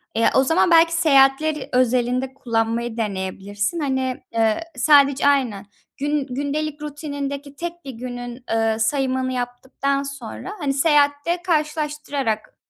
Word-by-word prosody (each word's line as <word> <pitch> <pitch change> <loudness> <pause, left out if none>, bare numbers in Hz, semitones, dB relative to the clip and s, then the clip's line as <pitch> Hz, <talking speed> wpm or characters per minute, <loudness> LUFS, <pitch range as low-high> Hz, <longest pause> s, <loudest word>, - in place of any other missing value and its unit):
Eee, 230 - +4
o 265 - +5
zaman 325 +5 +2
belki 330 0 +6
seyahatler 300 -2 +3
özelinde 250 +1 +1
kullanmayı 230 -2 -1
deneyebilirsin. 205 - -3
Hani, 265 -3 -2
eee, 225 +4 +1
sadece, 280 0 +5
aynen, 255 -9 +1 0.3
gün 290 0 -1
gündelik 290 +3 -3
rutinindeki 285 -1 -5
tek 345 +1 -6
1 270 - -5
günün, 245 0 -7
eee, 225 0 +1
sayımını 260 +2 0
yaptıktan 260 +3 -2
sonra, 275 - -7
hani, 285 -4 0
seyahatte 290 +3 +2
karşılaştırarak 300 -8 -2
270 Hz, 120 wpm, -22 LUFS, 245-295 Hz, 0.3 s, belki